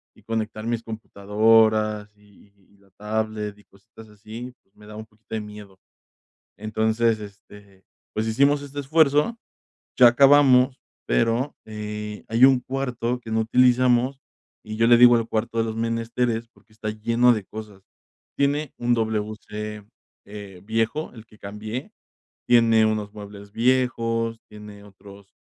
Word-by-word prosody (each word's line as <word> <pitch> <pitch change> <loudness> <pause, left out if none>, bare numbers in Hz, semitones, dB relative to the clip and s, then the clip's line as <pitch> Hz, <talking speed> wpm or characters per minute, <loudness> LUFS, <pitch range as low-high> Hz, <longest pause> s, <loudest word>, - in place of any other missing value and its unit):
Y - - -21
conectar 110 -1 -4
mis 115 -1 -2
computadoras, 110 0 +1
y 105 0 -23 0.2
y - - -26
la 100 -1 -27
tablet, 105 0 -4
y 105 - -20
cositas 100 +3 -18
así, 110 +4 -10
pues 95 - -45
me 105 - -17
daba 105 0 -10
un 110 - -8
poquito 110 +1 -16
de 110 - -2
miedo. 105 -2 -12 0.8
Entonces, 110 +1 0
este, 100 -2 -14 0.3
pues 110 +1 -2
hicimos 140 +5 +2
este 145 0 -8
esfuerzo. 150 - +2 0.6
Ya 125 -2 +8
acabamos, 135 0 +5 0.2
pero, 115 - 0
eh, 105 -1 -7
hay 115 +4 +5
un 135 -2 +4
cuarto 125 -2 -3
que 115 - -10
no 110 0 +1
utilizamos, 125 +2 +3 0.5
y 110 0 -6
yo 115 +1 +2
le 120 0 +7
digo 120 -1 +7
el 115 0 -2
cuarto 115 +1 -2
de - - +2
los 110 0 -4
menesteres, 115 0 -2
porque 110 - -27
está 110 0 -5
lleno 115 +3 +2
de 105 -4 -4
cosas. 105 -3 -10 0.5
Tiene 145 +1 0
un 120 0 +1
WC, 105 -1 -4 0.4
eh, 100 -3 -11
viejo, 115 +8 -2
el 110 -1 -13
que 105 - -20
cambié. 105 +5 -7 0.6
Tiene 115 -2 +4
unos 105 -1 -2
muebles 100 -1 -11
viejos, 115 -2 0
tiene 105 -1 -12
otros 100 0 -16
110 Hz, 145 wpm, -23 LUFS, 105-120 Hz, 0.8 s, Ya